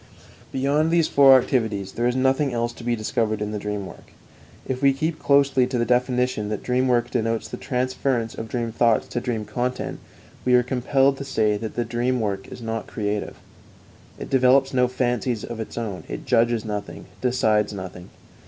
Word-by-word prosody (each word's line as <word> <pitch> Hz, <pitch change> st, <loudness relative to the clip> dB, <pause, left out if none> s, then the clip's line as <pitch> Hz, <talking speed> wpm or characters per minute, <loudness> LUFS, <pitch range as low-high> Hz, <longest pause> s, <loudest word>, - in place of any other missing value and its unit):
Beyond 145 Hz, +4 st, +1 dB
these 165 Hz, -1 st, +3 dB
four 135 Hz, -2 st, +7 dB
activities 110 Hz, -7 st, -1 dB
there 120 Hz, +3 st, 0 dB
is 125 Hz, -, 0 dB
nothing 135 Hz, +2 st, +2 dB
else 120 Hz, 0 st, -1 dB
to 120 Hz, -, -12 dB
be 120 Hz, 0 st, 0 dB
discovered 110 Hz, -1 st, -1 dB
in 105 Hz, 0 st, -3 dB
the 105 Hz, -, -3 dB
dream 105 Hz, -1 st, -4 dB
work. -, -, -13 dB, 0.5 s
If 130 Hz, 0 st, -3 dB
we 140 Hz, -1 st, +5 dB
keep 155 Hz, +4 st, -2 dB
closely 140 Hz, -2 st, +3 dB
to 130 Hz, -1 st, -2 dB
the 120 Hz, -, +1 dB
definition 125 Hz, -3 st, +1 dB
that 105 Hz, -, -4 dB
dream 130 Hz, +1 st, +1 dB
work 120 Hz, -1 st, +1 dB
denotes 115 Hz, 0 st, -1 dB
the -, -, -7 dB
transference 130 Hz, -3 st, -1 dB
of 115 Hz, -, -6 dB
dream 115 Hz, 0 st, -3 dB
thoughts 115 Hz, -1 st, +2 dB
to 120 Hz, -, -3 dB
dream 115 Hz, -4 st, -3 dB
content, 125 Hz, +4 st, -3 dB, 0.4 s
we 125 Hz, 0 st, +4 dB
are 125 Hz, -, +5 dB
compelled 135 Hz, +2 st, +2 dB
to 140 Hz, -, -5 dB
say 110 Hz, -6 st, +1 dB
that 110 Hz, +1 st, -6 dB
the 120 Hz, -, -1 dB
dream 120 Hz, +2 st, 0 dB
work 100 Hz, -3 st, -3 dB
is 120 Hz, -, -9 dB
not 115 Hz, 0 st, -4 dB
creative; 105 Hz, -2 st, -3 dB, 0.8 s
it -, -, -8 dB
develops 135 Hz, +1 st, +4 dB
no 125 Hz, -1 st, +3 dB
fancies 125 Hz, -2 st, -1 dB
of 120 Hz, -1 st, -6 dB
its 110 Hz, -, -6 dB
own, 105 Hz, -6 st, -4 dB
it -, -, -6 dB
judges 115 Hz, 0 st, +2 dB
nothing, 105 Hz, -2 st, -5 dB, 0.2 s
decides 110 Hz, -5 st, +2 dB
nothing. 95 Hz, -2 st, -8 dB
120 Hz, 190 wpm, -23 LUFS, 110-130 Hz, 0.8 s, four